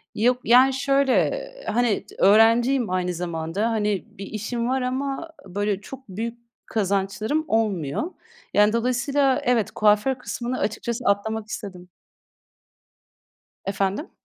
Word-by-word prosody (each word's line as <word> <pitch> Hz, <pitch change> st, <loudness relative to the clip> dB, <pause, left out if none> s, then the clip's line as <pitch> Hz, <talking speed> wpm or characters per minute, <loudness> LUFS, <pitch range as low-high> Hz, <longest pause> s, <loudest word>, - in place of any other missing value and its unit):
Yok, 250 Hz, +3 st, +2 dB
yani, 255 Hz, +3 st, +6 dB
şöyle: 275 Hz, 0 st, +2 dB, 0.4 s
Hani, 235 Hz, -3 st, +1 dB
d -, -, -14 dB
öğrenciyim 230 Hz, +3 st, +5 dB
aynı 180 Hz, -1 st, -1 dB
zamanda. 170 Hz, +4 st, -2 dB
Hani, 210 Hz, -3 st, 0 dB
bir 195 Hz, -, -6 dB
işim 235 Hz, +3 st, -3 dB
var 260 Hz, 0 st, 0 dB
ama 270 Hz, +5 st, -2 dB, 0.2 s
böyle 205 Hz, +1 st, -2 dB
çok 265 Hz, +1 st, -11 dB
büyük 230 Hz, +5 st, -5 dB, 0.3 s
kazançlarım 210 Hz, -, -1 dB
olmuyor. 210 Hz, -, 0 dB, 0.4 s
Yani 210 Hz, +1 st, +4 dB
dolayısıyla, 255 Hz, +3 st, +1 dB
evet, 230 Hz, -4 st, +1 dB
kuaför 210 Hz, +5 st, +3 dB
kısmını 240 Hz, +3 st, -4 dB
açıkçası 235 Hz, +3 st, -2 dB
atlamak 210 Hz, +2 st, 0 dB
istedim. 185 Hz, -4 st, -7 dB, 1.8 s
Efendim? 195 Hz, -, -2 dB
220 Hz, 115 wpm, -24 LUFS, 200-255 Hz, 1.8 s, yani